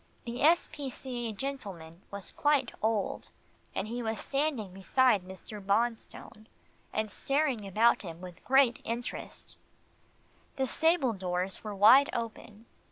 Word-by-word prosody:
The 240 +1 -5
S. 335 +4 +5
P. 285 -3 -5
C. 245 -2 -4
A. - - -3
gentleman 195 -9 -6
was 200 -1 -7
quite 290 -4 +2
old, 220 -2 -1 0.5
and 190 - -2
he 240 +2 -4
was 220 -1 -2
standing 275 -9 -1
beside 210 +3 +3
Mr. 190 +3 -10
Bonstone, 220 +1 -2 0.4
and 215 -1 -2
staring 275 -7 0
about 220 +5 +3
him 170 -4 -8
with 180 -1 -11
great 265 -2 +4
interest. 235 +2 -6 1.0
The 265 -2 0
stable 320 -3 +2
doors 185 -1 -2
were 210 -2 -5
wide 230 +8 +7
open. 225 -1 -6
225 Hz, 135 wpm, -30 LUFS, 200-265 Hz, 1.0 s, wide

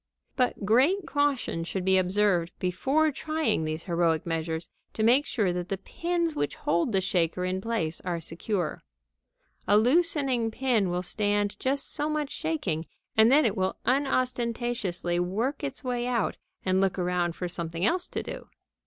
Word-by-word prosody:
"] - - -59
But 250 -5 0
great 280 - +3
caution 285 - 0
should 180 +2 -4
be 190 0 +5
observed 185 -2 +1
before 270 - +1
trying 310 - -1
these 155 +1 -3
heroic 170 -3 +1
measures 165 0 -2 0.3
to 220 - 0
make 250 +6 +4
sure 200 -7 0
that 180 0 -4
the 195 - -1
pins 335 - -2
which 145 - -1
hold 170 +7 0
the 195 - +3
shaker 180 -1 0
in 185 +1 -1
place 180 -8 -2
are 175 -2 -2
secure. 170 +2 -3 0.9
A 205 - +5
loosened 260 -3 +2
pin 235 -8 +1
will 180 +1 -1
stand 205 +2 +1
just 275 +1 -1
so 295 0 -1
much 300 -2 -2
shaking, 205 - -2 0.3
and 220 +2 +6
then 295 +2 +6
it 215 -3 +1
will 190 -2 -1
unostentatiously 240 -9 0
work 225 +12 -1
its 275 0 -4
way 245 -1 -1
out 240 -4 0 0.3
and 185 0 +2
look 195 -1 +1
around 175 -2 0
for 180 - -3
something 170 0 -2
else 355 +8 +1
to - - -4
do. - - -8
205 Hz, 165 wpm, -27 LUFS, 175-265 Hz, 0.9 s, and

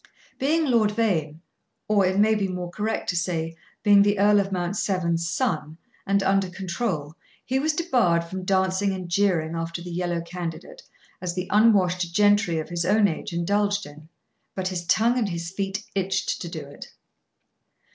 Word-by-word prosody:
Being 315 +4 +2
Lord 230 -6 +3
Vane 170 -8 -1 0.5
or 205 -3 +3
it 190 +1 0
may 215 +2 +4
be 205 -2 0
more 180 -1 -5
correct 215 +4 -2
to 180 - 0
say, 165 -2 -2 0.3
being 205 -1 +6
the 205 0 +3
Earl 205 +1 +5
of 195 0 -1
Mount 180 0 -2
Severn's 170 -4 0
son, 160 - -2 0.3
and 200 0 +2
under 195 -1 +2
control, 175 -4 -3 0.3
he 260 +1 0
was 310 +3 +1
debarred 245 - +2
from 185 +2 -6
dancing 190 +1 +1
and 185 -2 -5
jeering 175 -4 +1
after 165 +1 -4
the 175 0 -8
yellow 175 -1 -2
candidate, 170 -1 -7 0.4
as 180 -1 -3
the 180 0 -2
unwashed 185 -5 +3
gentry 205 -4 +3
of 155 - -4
his 175 -1 -2
own 205 +3 +4
age 165 -1 -4
indulged 200 +4 0
in, 155 +2 -13 0.5
but 185 -1 -2
his 175 -2 -5
tongue 235 +5 +3
and 215 -4 0
his 170 -1 -4
feet 195 +1 -3
itched 195 0 -1
to 170 - -5
do 165 -2 -6
it. 140 +1 -11
190 Hz, 175 wpm, -24 LUFS, 170-205 Hz, 0.5 s, being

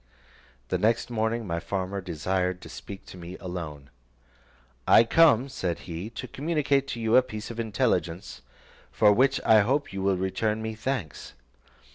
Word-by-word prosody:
The - - 0
next 115 +2 +1
morning 115 0 -1
my 85 -3 -2
farmer 95 +1 -3
desired 90 +1 -1
to - - -10
speak 100 -1 -9
with - - -11
me 85 +2 -8
alone. 75 -6 -7 1.0
"I - - +8
come," 140 -1 +5
said 95 -11 -3
he, 85 +4 -5
"to 120 +2 -7
communicate 140 0 0
to 120 - -5
you 110 0 +2
a - - +8
piece 110 -3 -7
of 115 - -8
intelligence, 95 - -1 0.5
for 105 - +5
which 135 +4 +3
I 110 - +7
hope 130 +4 0
you 95 - -3
will 95 -1 +2
return 95 +4 -1
me 110 0 -4
thanks. 110 - -4
105 Hz, 160 wpm, -27 LUFS, 90-120 Hz, 1.0 s, I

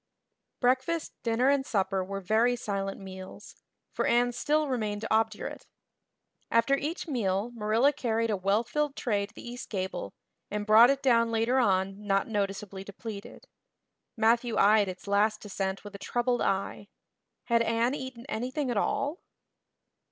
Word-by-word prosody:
Breakfast, 260 +6 +1
dinner, 235 +3 +2
and 280 -1 +3
supper 195 -5 0
were 195 +1 -5
very 225 +6 +2
silent 195 -4 -3
meals 190 +1 -10 0.4
for - - -1
Anne 245 +1 +3
still 300 +5 +1
remained 215 -5 -2
obdurate. 220 -1 -1 0.8
After 230 +4 +3
each 305 +6 -4
meal 215 -5 -1
Marilla 230 +5 +2
carried 230 -3 0
a - - +2
well 195 +4 +1
filled 295 +3 -1
tray 205 -4 -1
to - - -23
the - - -10
east 245 +1 -7
gable 190 -2 -4 0.3
and 210 0 -3
brought 225 +3 +8
it 275 0 0
down 230 -3 +4
later 230 +3 +2
on 195 -2 +1
not 195 -1 +2
noticeably 195 -2 -3
depleted. 200 +1 -9 0.7
Matthew 230 +1 +2
eyed 210 0 +5
its 185 -1 -7
last 210 +2 +2
descent 195 -1 -3
with 205 -1 -10
a 200 - -8
troubled 245 +3 0
eye. 195 +1 -1 0.6
Had 235 -1 +2
Anne 230 +2 +1
eaten 260 -3 -6
anything 255 +3 -2
at 230 - -1
all? 285 - 0
225 Hz, 150 wpm, -29 LUFS, 200-245 Hz, 0.8 s, brought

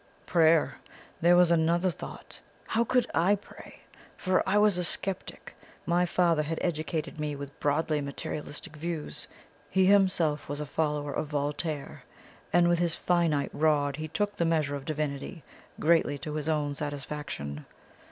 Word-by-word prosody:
"PRAYER! 165 -2 +3 0.4
There 175 +1 +6
was 175 -1 +5
another 170 +2 +3
thought. - - -9 0.2
How 230 +1 +1
could 250 +1 +2
I 185 +5 +4
pray? 205 - -14 0.4
For 185 -1 +2
I 205 - +3
was 210 -3 +4
a - - 0
sceptic. 190 +2 -1 0.3
My 175 +1 +2
father 170 -3 +2
had 160 +2 -3
educated 160 -1 -2
me 150 -1 -2
with 140 0 -9
broadly 150 +1 +1
materialistic 145 +3 -6
views; 165 -1 -5 0.4
he 190 +3 +3
himself 185 -7 +3
was 145 0 -2
a 150 - -3
follower 150 -1 -1
of 155 - -2
Voltaire, 145 +1 -3 0.5
and 175 +1 +5
with 175 -1 +3
his 170 -2 +1
finite 165 -5 +1
rod 145 -2 +2
he 155 0 -4
took 205 +6 -2
the - - 0
measure 155 -4 +1
of 140 -1 -7
Divinity, 150 +2 -4 0.4
greatly 160 -3 +3
to 150 +2 -6
his 155 0 -2
own 150 -2 0
satisfaction. 140 - -5
160 Hz, 150 wpm, -28 LUFS, 145-175 Hz, 0.5 s, There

